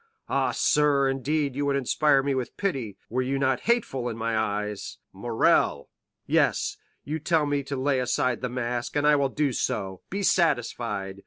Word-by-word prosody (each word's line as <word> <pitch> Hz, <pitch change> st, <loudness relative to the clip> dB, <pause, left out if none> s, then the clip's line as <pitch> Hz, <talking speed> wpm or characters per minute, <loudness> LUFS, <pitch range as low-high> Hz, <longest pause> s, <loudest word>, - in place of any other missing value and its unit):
Ah, -, -, +1 dB
sir, 145 Hz, -2 st, +3 dB
indeed 140 Hz, +1 st, -1 dB
you 145 Hz, -, -1 dB
would 140 Hz, -, +1 dB
inspire 140 Hz, +1 st, +2 dB
me 140 Hz, 0 st, 0 dB
with 130 Hz, -2 st, -4 dB
pity, 130 Hz, -, -2 dB
were 125 Hz, +3 st, -1 dB
you 135 Hz, +2 st, -1 dB
not 130 Hz, -2 st, +1 dB
hateful 135 Hz, -, +1 dB
in 115 Hz, -, -5 dB
my 115 Hz, 0 st, -1 dB
eyes." 105 Hz, -1 st, -2 dB, 0.2 s
"Morrel——" 115 Hz, +4 st, +1 dB, 0.4 s
"Yes; -, -, +1 dB, 0.3 s
you 155 Hz, +2 st, -3 dB
tell 155 Hz, 0 st, +1 dB
me 145 Hz, -1 st, 0 dB
to 140 Hz, 0 st, -5 dB
lay 135 Hz, 0 st, +1 dB
aside 125 Hz, -1 st, 0 dB
the 125 Hz, -, -2 dB
mask, 120 Hz, -1 st, -3 dB
and 145 Hz, 0 st, +1 dB
I 150 Hz, 0 st, +6 dB
will 140 Hz, -1 st, +1 dB
do 145 Hz, -1 st, 0 dB
so, 95 Hz, -4 st, -2 dB
be 200 Hz, +2 st, -3 dB
satisfied! 115 Hz, -, 0 dB
135 Hz, 175 wpm, -26 LUFS, 120-145 Hz, 0.4 s, I